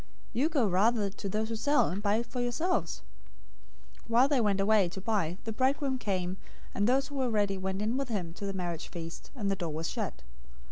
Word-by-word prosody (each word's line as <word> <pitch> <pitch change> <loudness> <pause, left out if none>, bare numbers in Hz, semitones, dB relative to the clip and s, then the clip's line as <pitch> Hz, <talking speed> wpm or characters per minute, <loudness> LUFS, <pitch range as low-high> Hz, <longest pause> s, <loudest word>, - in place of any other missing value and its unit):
You 265 +7 +2
go 285 -8 +2
rather 200 +2 +3
to 200 0 -5
those 215 +3 -1
who 225 - -2
sell, 290 +6 +3
and 190 +4 -3
buy 210 +2 +2
for 245 +1 -4
yourselves.' 315 +10 0 1.0
025:010 - - -22
While 240 +3 +5
they 275 -4 +3
went 205 -3 +2
away 200 -2 +4
to 185 - -7
buy, 190 -4 0
the 225 - -3
bridegroom 265 +2 +1
came, 185 -4 -1 0.4
and 205 +1 +2
those 270 +3 +2
who 285 - -8
were 260 -2 +1
ready 205 -3 +1
went 190 +2 -2
in 225 +4 0
with 275 -2 -2
him 180 -7 -2
to 200 +3 -5
the 195 - -2
marriage 175 -4 -3
feast, 165 -1 -7
and 205 -6 -1
the - - +1
door 170 -4 -3
was 160 +2 -3
shut. - - -4
210 Hz, 220 wpm, -30 LUFS, 190-245 Hz, 1.0 s, While